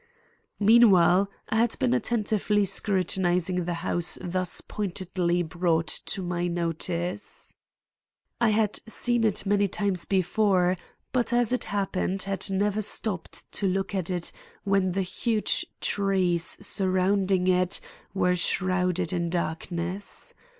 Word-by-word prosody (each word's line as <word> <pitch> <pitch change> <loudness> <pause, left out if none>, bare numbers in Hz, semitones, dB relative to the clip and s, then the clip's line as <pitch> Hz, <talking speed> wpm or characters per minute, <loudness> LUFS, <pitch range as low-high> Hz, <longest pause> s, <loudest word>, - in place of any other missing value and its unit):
Meanwhile 200 -4 +6 0.2
I 220 - 0
had 230 0 +2
been 255 -3 +1
attentively 215 -3 +1
scrutinizing 185 -2 0
the 175 0 -2
house 175 -1 +2
thus 180 0 -2
pointedly 180 -3 -2
brought 165 0 0
to 185 +4 -1
my 175 0 -1
notice. 170 +2 -3 0.9
I 235 - +4
had 215 -1 +1
seen 240 +1 0
it 215 -2 0
many 200 0 +2
times 195 -2 -2
before, 185 -1 +2 0.4
but, 245 -2 0
as 240 0 +2
it 250 - -1
happened, 195 -1 -1
had 195 0 -1
never 205 +2 0
stopped 205 -3 -4
to 200 - -1
look 195 +2 -1
at 185 -3 -1
it 175 -2 -2 0.3
when 195 -2 +1
the 195 +1 0
huge 215 +4 0
trees 185 -4 +1
surrounding 190 0 +1
it 180 -1 +2 0.4
were 180 -2 +2
shrouded 180 -1 0
in 170 -1 -1
darkness. 175 +3 -3
185 Hz, 120 wpm, -26 LUFS, 180-205 Hz, 0.9 s, Meanwhile